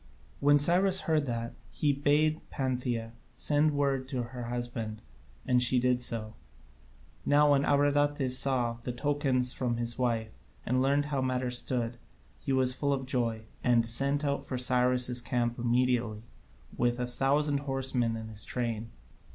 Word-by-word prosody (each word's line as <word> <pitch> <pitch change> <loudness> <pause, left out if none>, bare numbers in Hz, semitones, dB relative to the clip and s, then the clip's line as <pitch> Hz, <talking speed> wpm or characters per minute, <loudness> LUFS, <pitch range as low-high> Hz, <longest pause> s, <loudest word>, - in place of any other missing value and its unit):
When 145 +1 +5
Cyrus 185 +6 +4
heard 155 -3 0
that, 115 -1 -4 0.2
he 145 -2 +1
bade 150 +3 +1
Pantheia 125 -4 -2 0.2
send 150 +3 +2
word 135 -2 0
to 130 -2 -3
her 120 0 -7
husband, 120 -2 -4 0.5
and 125 -1 +2
she 125 +1 +3
did 125 0 +1
so. 110 -2 -1 0.9
Now 145 0 +4
when 140 -1 +3
Abradatas 145 -2 +2
saw 125 -4 +2
the 125 +1 -5
tokens 130 -2 0
from 120 -2 -2
his 120 +1 -1
wife, 115 -3 -1 0.3
and 130 +2 +1
learnt 140 +2 +2
how 135 - 0
matters 125 -1 -1
stood, 120 -2 -3 0.4
he - - -4
was 130 -1 +2
full 140 +2 -1
of 135 -1 -3
joy, 115 -4 -2 0.2
and 120 -2 +3
set 140 +5 +1
out 140 0 -1
for 130 - -4
Cyrus' 125 0 +1
camp 120 -1 -2
immediately, 120 -2 0 0.5
with 120 0 0
a 125 - -1
thousand 140 +3 +1
horsemen 130 -4 -1
in 110 0 -7
his 105 -1 -2
train. 115 -2 -3
125 Hz, 150 wpm, -29 LUFS, 120-140 Hz, 0.9 s, When